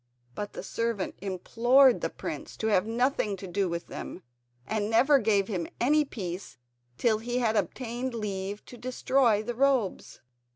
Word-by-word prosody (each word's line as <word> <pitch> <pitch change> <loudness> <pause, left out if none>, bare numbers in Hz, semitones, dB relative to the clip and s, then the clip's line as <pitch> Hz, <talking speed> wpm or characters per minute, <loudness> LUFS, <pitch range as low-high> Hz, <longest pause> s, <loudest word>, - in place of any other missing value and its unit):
But 205 +9 -5
the - - -6
servant 230 -4 -2
implored 240 +7 +4
the - - 0
prince - - -7
to - - -3
have 205 -1 +3
nothing 230 -3 0
to 190 - -8
do 190 +1 -1
with 170 0 -3
them, 185 - -8 0.4
and 210 +6 -1
never 270 +5 +5
gave 205 -4 +2
him 180 -6 -2
any 300 +5 +3
peace 185 - -6 0.4
till 220 -3 +2
he 240 +2 -2
had 225 -3 +1
obtained 240 +5 -2
leave 200 -2 -4
to 245 - -11
destroy 250 -3 +2
the 240 +2 -3
robes. 255 -5 0
225 Hz, 160 wpm, -28 LUFS, 200-245 Hz, 0.4 s, never